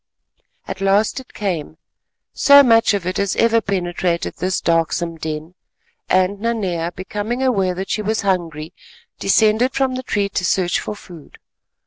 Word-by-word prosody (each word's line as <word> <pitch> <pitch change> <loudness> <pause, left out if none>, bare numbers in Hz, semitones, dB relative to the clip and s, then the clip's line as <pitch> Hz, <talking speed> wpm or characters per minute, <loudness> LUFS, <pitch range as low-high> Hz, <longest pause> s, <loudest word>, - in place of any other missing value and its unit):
At - - -6
last 200 +6 +2
it 260 - -14
came—so 195 - +1
much 225 -4 +4
of 195 -4 -4
it 185 +1 -2
as 200 -1 0
ever 230 0 +3
penetrated 175 -3 -2
this 185 0 -1
darksome 165 0 0
den—and 180 +4 -3
Nanea, 190 -7 -2
becoming 210 +7 -4
aware 195 -8 +1
that 190 +2 -5
she 215 - 0
was 215 +1 -1
hungry, 170 -5 -2 0.5
descended 220 +4 +2
from 270 -1 +1
the 255 - -3
tree 205 -5 -1
to 185 - -2
search 180 0 +1
for 210 - -5
food. 175 -7 -14
195 Hz, 140 wpm, -19 LUFS, 175-220 Hz, 0.5 s, much